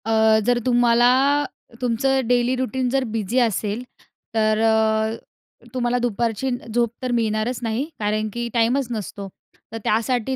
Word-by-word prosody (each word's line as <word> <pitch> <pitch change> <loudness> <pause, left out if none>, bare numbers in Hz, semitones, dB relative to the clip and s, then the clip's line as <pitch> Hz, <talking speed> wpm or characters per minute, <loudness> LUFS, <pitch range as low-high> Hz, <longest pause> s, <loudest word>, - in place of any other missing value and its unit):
अ, 220 0 +4
जर 245 0 +2
तुम्हाला 240 -1 +4 0.7
तुमचं 250 +3 +1
डेली 245 +1 +2
रुटीन 255 0 -1
जर 270 +1 +1
बिझी 225 +3 0
असेल, 225 -1 0 0.5
तर 215 -1 +2
अ, 220 0 +2 0.6
तुम्हाला 245 -1 0
दुपारची 235 +1 -1 0.2
झोप 235 0 +2
तर 255 - -1
मिळणारच 225 +1 0
नाही 230 +4 -1
कारण 215 +1 -1
की 240 0 -3
टाईमच 245 +3 +2
नसतो. 205 -3 -5 0.5
तर - - -3
त्यासाठी 240 +3 0
235 Hz, 135 wpm, -22 LUFS, 220-245 Hz, 0.7 s, अ